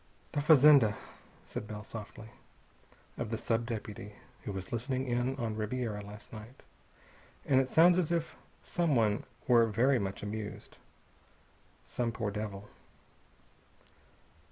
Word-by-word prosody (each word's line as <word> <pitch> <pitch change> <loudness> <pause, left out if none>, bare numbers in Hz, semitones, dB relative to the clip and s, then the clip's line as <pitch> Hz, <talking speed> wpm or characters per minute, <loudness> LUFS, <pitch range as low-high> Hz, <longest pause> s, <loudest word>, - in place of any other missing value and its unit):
"The 145 - 0
fazenda," 145 -7 +7 0.5
said 105 - -6
Bell 105 0 -6
softly, 110 0 -9 0.9
"of - - -2
the 115 - -2
sub 115 +1 -1
deputy 105 -3 -6 0.3
who - - -3
was 95 -1 -6
listening 130 +3 -1
in 120 +2 0
on 115 -5 -3
Ribiera 110 -1 -2
last 105 +3 -11
night. 110 +4 -11 0.8
And 135 -1 +4
it 130 - -3
sounds 175 +4 +6
as 170 -2 0
if 165 -1 -1 0.3
someone 120 -12 +1 0.2
were 120 -2 +6
very 120 +4 +3
much 95 -1 -4
amused. 105 0 -6 1.1
Some 120 -1 -2
poor 110 -3 -3
devil...." 105 -1 -5
115 Hz, 125 wpm, -32 LUFS, 105-130 Hz, 1.1 s, fazenda